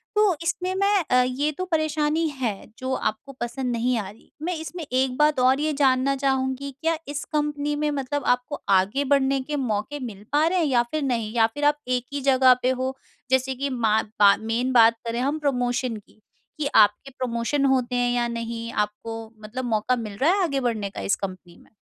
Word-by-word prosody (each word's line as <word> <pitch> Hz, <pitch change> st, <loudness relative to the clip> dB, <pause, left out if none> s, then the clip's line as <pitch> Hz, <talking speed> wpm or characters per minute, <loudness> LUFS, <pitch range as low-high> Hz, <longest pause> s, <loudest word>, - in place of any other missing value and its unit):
तो 420 Hz, -5 st, +4 dB
इसमें 365 Hz, +2 st, -1 dB
मैं 395 Hz, -1 st, +2 dB
अ, 250 Hz, -, +6 dB
ये 270 Hz, +4 st, -1 dB
तो 370 Hz, +5 st, -4 dB
परेशानी 310 Hz, -1 st, 0 dB
है 245 Hz, -8 st, -4 dB
जो 260 Hz, 0 st, -3 dB
आपको 255 Hz, +5 st, -3 dB
पसंद 245 Hz, +1 st, -2 dB
नहीं 240 Hz, +1 st, 0 dB
आ 195 Hz, -2 st, -5 dB
रही 210 Hz, -, -16 dB
है। -, -, -28 dB, 0.2 s
मैं 355 Hz, 0 st, -1 dB
इसमें 320 Hz, +2 st, -6 dB
एक 260 Hz, -2 st, 0 dB
बात 300 Hz, -2 st, +3 dB
और 260 Hz, +2 st, +4 dB
ये 305 Hz, 0 st, 0 dB
जानना 275 Hz, -1 st, +2 dB
चाहूँगी 265 Hz, 0 st, -1 dB
क्या 325 Hz, 0 st, +1 dB
इस 290 Hz, 0 st, -4 dB
कंपनी 295 Hz, -1 st, 0 dB
में 300 Hz, 0 st, 0 dB
मतलब 280 Hz, 0 st, -2 dB
आपको 250 Hz, +4 st, -6 dB
आगे 200 Hz, +8 st, +3 dB
बढ़ने 275 Hz, 0 st, +2 dB
के 295 Hz, +2 st, -4 dB
मौके 255 Hz, +2 st, -2 dB
मिल 210 Hz, -5 st, -7 dB
पा 295 Hz, +2 st, +3 dB
रहे 365 Hz, +1 st, +1 dB
हैं 330 Hz, -, +2 dB
या 250 Hz, -5 st, +3 dB
फिर 310 Hz, -, -1 dB
नहीं? 230 Hz, -5 st, -1 dB
या 225 Hz, -1 st, +5 dB
फिर 290 Hz, +5 st, -3 dB
आप 295 Hz, 0 st, +4 dB
एक 250 Hz, -1 st, 0 dB
ही 285 Hz, -, -2 dB
जगह 260 Hz, -1 st, +5 dB
पे 255 Hz, -, +3 dB
हो 260 Hz, +1 st, -1 dB, 0.4 s
जैसे 260 Hz, 0 st, +2 dB
कि 280 Hz, +2 st, -2 dB
मैं 255 Hz, -3 st, -4 dB
मा 220 Hz, -1 st, +3 dB, 0.2 s
बा 200 Hz, -1 st, +7 dB
मेन 240 Hz, +3 st, 0 dB
बात 230 Hz, -1 st, +6 dB
करें 230 Hz, +1 st, -2 dB
हम 285 Hz, +4 st, 0 dB
प्रमोशन 250 Hz, -4 st, -1 dB
की, 210 Hz, +1 st, -18 dB, 0.4 s
कि 285 Hz, -, 0 dB
आपके 215 Hz, +6 st, +4 dB
प्रमोशन 255 Hz, +3 st, 0 dB
होते 255 Hz, -2 st, +1 dB
हैं 245 Hz, 0 st, +1 dB
या 240 Hz, -1 st, +1 dB
नहीं, 230 Hz, 0 st, -4 dB
आपको 225 Hz, +2 st, -4 dB
मतलब 245 Hz, +4 st, -5 dB
मौका 225 Hz, +1 st, +1 dB
मिल 210 Hz, -3 st, -6 dB
रहा 305 Hz, +6 st, +3 dB
है 395 Hz, -1 st, +1 dB
आगे 280 Hz, -5 st, 0 dB
बढ़ने 220 Hz, -5 st, -1 dB
का -, -, -7 dB
इस 200 Hz, -, +1 dB
कंपनी 185 Hz, -3 st, -7 dB
में? -, -, -23 dB
260 Hz, 215 wpm, -24 LUFS, 230-290 Hz, 0.4 s, बा